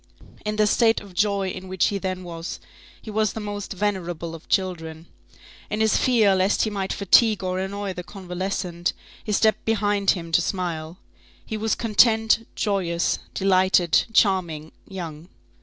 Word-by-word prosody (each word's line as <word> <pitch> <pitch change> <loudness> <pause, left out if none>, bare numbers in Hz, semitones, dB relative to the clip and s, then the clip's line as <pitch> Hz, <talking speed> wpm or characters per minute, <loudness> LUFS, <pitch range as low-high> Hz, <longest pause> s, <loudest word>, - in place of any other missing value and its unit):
In 210 0 -2
the 215 0 +3
state 225 +2 +3
of 200 -2 -13
joy 200 0 +1
in 185 0 -7
which 185 -2 +1
he 200 - -2
then 185 -1 -3
was, 170 -1 -6 0.4
he 215 - -9
was 215 -1 +1
the - - -5
most 205 -1 -5
venerable 175 -4 -3
of 165 - -11
children. 165 -4 -2 0.6
In 210 - -2
his 220 -1 +3
fear 225 -6 +4
lest 190 +2 +2
he 215 - -1
might 195 -2 -3
fatigue 210 +1 +4
or 185 0 -1
annoy 195 +1 -3
the 180 - -6
convalescent, 180 -1 -3 0.3
he 215 - -4
stepped 220 +1 +2
behind 205 -3 +1
him 165 -1 -7
to 165 - +4
smile. 170 -2 -3 0.5
He 220 - -5
was 220 +1 0
content, 225 0 +3
joyous, 180 -5 0 0.2
delighted, 185 -3 +3
charming, 175 -8 +1 0.2
young. 170 -3 -7
190 Hz, 155 wpm, -24 LUFS, 175-210 Hz, 0.6 s, fear